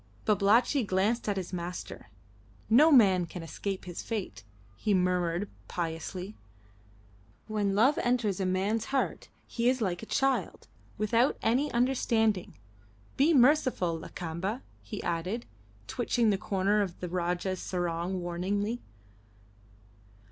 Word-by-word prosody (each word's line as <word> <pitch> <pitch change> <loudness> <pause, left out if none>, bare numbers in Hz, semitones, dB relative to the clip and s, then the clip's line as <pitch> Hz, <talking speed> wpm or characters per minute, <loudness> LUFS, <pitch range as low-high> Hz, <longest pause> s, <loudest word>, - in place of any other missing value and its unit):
Babalatchi 215 +6 +3
glanced 210 +4 0
at 200 - -1
his 185 0 -5
master. 175 0 -6 0.6
"No 300 +8 +7
man 190 - +5
can 175 0 -7
escape 190 +3 -5
his 175 -2 -6
fate," 185 - -5 0.3
he 205 - +1
murmured 180 0 +1 0.2
piously. 175 +3 -4 1.1
"When 205 -2 -1
love 255 +8 +4
enters 240 -6 0
a 190 - 0
man's 200 +4 0
heart 270 0 -2 0.2
he 235 +1 0
is 255 0 +1
like 185 -6 -1
a 220 - -9
child 270 0 0 0.3
without 230 +5 +2
any 255 +6 +2
understanding. 230 -5 +1 0.6
Be 290 +5 +4
merciful, 255 - +3
Lakamba," 180 +8 -5 0.2
he 210 - -7
added, 180 +8 -2 0.4
twitching 235 - +1
the 195 - +1
corner 200 +2 +1
of 185 -4 -3
the 180 - -4
Rajah's 180 +1 -2
sarong 175 +1 -2
warningly. 200 +6 -2
200 Hz, 120 wpm, -29 LUFS, 180-235 Hz, 1.1 s, No